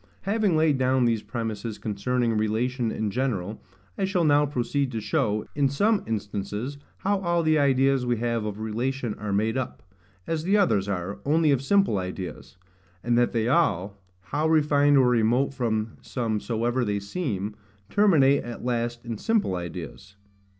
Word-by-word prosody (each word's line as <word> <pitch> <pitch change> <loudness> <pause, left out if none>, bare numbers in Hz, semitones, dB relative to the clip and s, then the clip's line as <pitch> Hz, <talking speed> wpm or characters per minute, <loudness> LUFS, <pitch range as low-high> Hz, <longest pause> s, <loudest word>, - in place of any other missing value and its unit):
Having 200 -4 +1
laid 155 -4 +3
down 130 -1 +2
these 115 -2 +1
premises 110 -2 -4
concerning 115 +3 -1
relation 115 +3 0
in 110 -2 -2
general, 110 -5 -2 0.4
I - - +2
shall 190 -3 +1
now 145 -1 +4
proceed 135 0 -1
to 115 - -2
show, 105 0 0
in 140 -1 +2
some 205 +9 +2
instances, 105 +5 -4 0.2
how 200 0 0
all 170 -2 +1
the 155 -1 +3
ideas 135 -1 +3
we 120 -1 0
have 115 -1 -1
of 105 -1 -4
relation 120 +2 -2
are 105 -1 -4
made 110 +4 +1
up, 130 - -6 0.4
as 160 -1 -2
the 195 +4 +3
others 105 - +2
are, 100 +1 -3
only 155 +1 +3
of 135 -2 +2
simple 195 - +2
ideas; 90 0 -6 0.5
and 120 0 +1
that 120 0 +3
they 115 -1 0
all, 100 - +1 0.2
how 145 +11 -1
refined 145 -2 +4
or 130 -2 +5
remote 125 +3 +2
from 110 -4 -2
sense 115 -4 -3
soever 120 +2 0
they 105 -2 -1
seem, 105 - -3 0.4
terminate 155 -10 +4
at 120 0 -7
last 120 -1 -2
in 115 -3 -5
simple 220 - +1
ideas. 90 +3 -7
120 Hz, 165 wpm, -26 LUFS, 105-145 Hz, 0.5 s, or